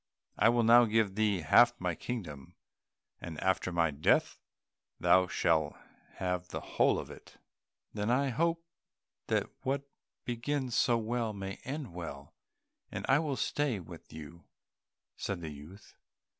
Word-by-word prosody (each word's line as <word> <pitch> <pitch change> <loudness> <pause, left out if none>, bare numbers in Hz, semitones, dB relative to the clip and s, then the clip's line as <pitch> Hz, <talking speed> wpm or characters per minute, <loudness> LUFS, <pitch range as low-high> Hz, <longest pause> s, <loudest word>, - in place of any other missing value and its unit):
I - - +4
will 120 0 +3
now 120 +2 +7
give 110 -3 +1
thee 105 -3 +1
half 80 - +5
my - - -1
kingdom, 80 - -6 0.6
and 80 -3 -7
after 95 -1 0
my 85 -2 +2
death 70 +2 +2 0.6
thou 95 0 +4
shalt 80 -3 +1 0.4
have 90 -1 -2
the - - -5
whole - - +2
of - - -6
it." - - -14 0.6
"Then 105 +1 -2
I 135 +3 +2
hope 165 +6 0 0.6
that - - +1
what 135 +1 -1 0.4
begins 125 +1 -2
so 120 -3 +3
well 115 0 -2
may 95 -1 -6
end 135 - -5
well, 75 -5 -8 0.6
and - - -4
I 135 - +5
will 150 -4 -1
stay 145 -8 0
with 85 - -12
you," 80 +2 -10 0.7
said 100 -3 -3
the 80 - -5
youth. 75 +8 -13
105 Hz, 145 wpm, -31 LUFS, 85-125 Hz, 0.7 s, now